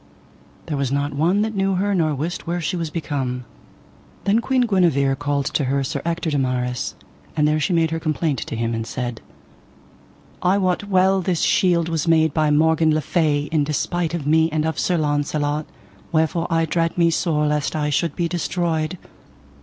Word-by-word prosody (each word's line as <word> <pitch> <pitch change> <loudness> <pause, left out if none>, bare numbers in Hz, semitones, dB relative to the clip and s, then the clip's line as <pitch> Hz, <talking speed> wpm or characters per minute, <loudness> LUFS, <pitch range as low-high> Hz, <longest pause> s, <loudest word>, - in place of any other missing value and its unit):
There 150 - -3
was 135 -2 -1
not 140 +1 -1
one 175 +8 +2
that 220 0 -2
knew 195 0 +1
her 200 +2 0
nor 160 -5 +1
wist 165 +6 -4
where 175 +1 -1
she 175 +3 -2
was 165 -2 -3
become. 135 -6 -3 0.8
Then 205 +3 +3
Queen 255 +2 +1
Guenever 170 - +2
called 145 -1 -1
to 145 - +1
her 135 +1 0
Sir 130 - -3
Ector 170 -1 -2
de 145 - +1
Maris, 125 -1 -2 0.4
and 150 -1 +3
there 155 +1 +2
she 155 - 0
made 165 -2 +2
her 165 - -1
complaint 155 -3 -1
to - - -5
him, 115 +1 -1
and 115 0 -3
said: 120 -3 -4 1.2
I 185 +2 +3
wot 185 0 0
well 190 -1 +3
this 180 -2 -1
shield 170 -3 +3
was 165 -1 -2
made 160 -2 +3
by 155 -2 +2
Morgan 160 +1 +3
le 155 - +1
Fay 150 -3 +1
in 155 -2 +2
despite 165 +3 -1
of 160 -5 -4
me 160 +2 +3
and 155 0 0
of 160 - -2
Sir 180 - +1
Launcelot, 145 0 -1 0.4
wherefore 160 +1 +1
I 165 0 +2
dread 165 +2 -1
me 170 -1 +4
sore 160 -2 +1
lest 150 -2 0
I 150 -1 0
should 155 +2 0
be 170 - 0
destroyed. 170 -1 -1
160 Hz, 190 wpm, -21 LUFS, 145-175 Hz, 1.2 s, me